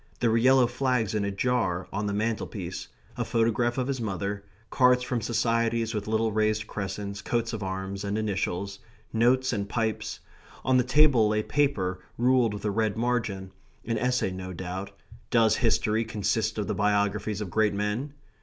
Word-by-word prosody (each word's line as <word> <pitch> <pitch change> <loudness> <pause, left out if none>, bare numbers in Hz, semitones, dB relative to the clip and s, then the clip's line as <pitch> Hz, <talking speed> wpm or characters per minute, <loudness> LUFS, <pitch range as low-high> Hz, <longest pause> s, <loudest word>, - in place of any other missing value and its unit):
There 120 -2 +2
were 115 - +3
yellow 130 +1 +5
flags 125 -3 0
in 105 -1 0
a 100 - 0
jar 100 -4 0
on 105 +1 -1
the - - -1
mantelpiece; 105 -4 -3 0.3
a - - -1
photograph 115 +1 +1
of 130 - +1
his 135 -3 -2
mother; 100 -1 -3 0.3
cards 125 -1 +4
from 125 -1 -2
societies 115 0 +1
with 105 -1 -3
little 110 0 +1
raised 110 0 +1
crescents, 100 0 -5
coats 115 +2 -1
of 110 - -4
arms, 95 +1 -4
and 100 +1 -1
initials; 100 -2 -2 0.3
notes 125 +3 +3
and 100 -2 -2
pipes; 110 -2 -2 0.5
on 130 -1 +4
the 125 - +4
table 130 -4 +5
lay 105 0 +1
paper 105 -12 0 0.2
ruled 120 -3 +3
with 105 - -7
a 105 - +1
red 110 0 0
margin 110 -6 -1 0.3
an 115 -1 -1
essay, 125 -5 +1
no 95 0 -6
doubt 95 +2 -5 0.4
"Does 110 -2 +4
History 110 -2 +2
consist 110 0 -1
of 105 - -1
the 105 - -1
Biographies 105 0 0
of 100 -4 -5
Great 105 0 +2
Men?" 105 +8 -2
110 Hz, 175 wpm, -27 LUFS, 100-120 Hz, 0.5 s, yellow